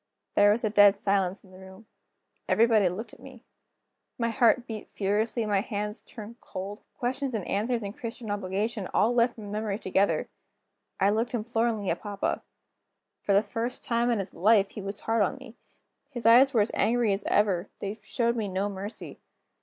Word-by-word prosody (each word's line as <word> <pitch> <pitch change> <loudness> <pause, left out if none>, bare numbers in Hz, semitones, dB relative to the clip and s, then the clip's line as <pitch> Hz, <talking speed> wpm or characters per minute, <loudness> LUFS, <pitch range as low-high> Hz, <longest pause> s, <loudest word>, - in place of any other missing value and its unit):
There 205 0 +5
was 225 +3 0
a 215 - 0
dead 205 -1 +6
silence 195 -2 0
in 190 - -19
the 185 - -14
room. 190 +3 -13 0.6
Everybody 220 -4 +4
looked 205 +7 -7
at - - -15
me. - - -13 0.7
My 230 -1 0
heart 240 +1 +3
beat 220 -3 -7
furiously, 215 +3 -1
my 205 -2 +1
hands 210 0 -4
turned 225 +1 -11
cold, 195 +3 -7
the - - -42
questions 255 +1 -2
and 200 -5 -3
answers 230 +3 -1
in 200 0 -5
Christian 230 -2 -6
Obligation 205 +1 -2
all 230 +3 +3
left 240 0 +2
my 220 - -9
memory 205 0 -3
together. 195 -1 +1 0.7
I 195 +1 +4
looked 230 +3 -1
imploringly 225 -3 -1
at 170 - -3
papa. 205 -2 -2 0.8
For 200 - +1
the 200 +2 +5
first 235 +2 -4
time 235 0 +1
in 235 - +2
his 195 -1 -4
life, 200 +3 +3
he 210 - -7
was 200 +1 -5
hard 225 0 +1
on 200 - +1
me. 265 -4 -12 0.5
His 240 -5 -7
eyes 250 +4 +7
were 230 -5 +3
as 205 - 0
angry 235 -2 +2
as 195 - -2
ever; 200 -3 +1
they 200 0 -4
showed 235 +2 0
me 220 -3 -2
no 195 +2 -1
mercy. 200 +3 -7
210 Hz, 185 wpm, -27 LUFS, 200-235 Hz, 0.8 s, eyes